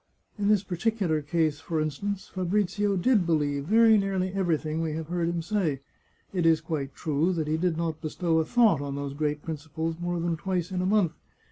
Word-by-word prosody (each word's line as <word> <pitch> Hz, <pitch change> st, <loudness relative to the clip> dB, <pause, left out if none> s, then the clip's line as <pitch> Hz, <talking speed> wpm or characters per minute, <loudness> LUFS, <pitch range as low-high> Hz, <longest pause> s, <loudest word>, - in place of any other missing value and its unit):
In 200 Hz, -, +1 dB
this 210 Hz, -2 st, +4 dB
particular 185 Hz, -3 st, 0 dB
case, 155 Hz, 0 st, 0 dB
for 160 Hz, 0 st, -2 dB
instance, 190 Hz, +6 st, -3 dB
Fabrizio 195 Hz, +2 st, 0 dB
did 210 Hz, +2 st, +3 dB
believe 145 Hz, -3 st, 0 dB
very 220 Hz, +3 st, +6 dB
nearly 190 Hz, -1 st, -1 dB
everything 160 Hz, -4 st, 0 dB
we 160 Hz, -2 st, -2 dB
have 160 Hz, 0 st, -5 dB
heard 175 Hz, -1 st, 0 dB
him 170 Hz, -1 st, -2 dB
say. 170 Hz, -8 st, -1 dB, 0.5 s
It 175 Hz, -3 st, +2 dB
is 160 Hz, -1 st, +5 dB
quite 145 Hz, -4 st, -4 dB
true 155 Hz, +2 st, 0 dB
that 160 Hz, -3 st, -2 dB
he 155 Hz, -, +1 dB
did 165 Hz, 0 st, 0 dB
not 165 Hz, -2 st, -2 dB
bestow 160 Hz, +1 st, 0 dB
a 160 Hz, -, +1 dB
thought 220 Hz, -, +4 dB
on 140 Hz, -1 st, -4 dB
those 140 Hz, -1 st, -4 dB
great 150 Hz, 0 st, -2 dB
principles 160 Hz, +1 st, -4 dB
more 175 Hz, 0 st, -1 dB
than 170 Hz, -1 st, -1 dB
twice 180 Hz, 0 st, -2 dB
in 180 Hz, -1 st, -1 dB
a 185 Hz, -, 0 dB
month. 200 Hz, -5 st, +3 dB
170 Hz, 200 wpm, -27 LUFS, 155-190 Hz, 0.5 s, very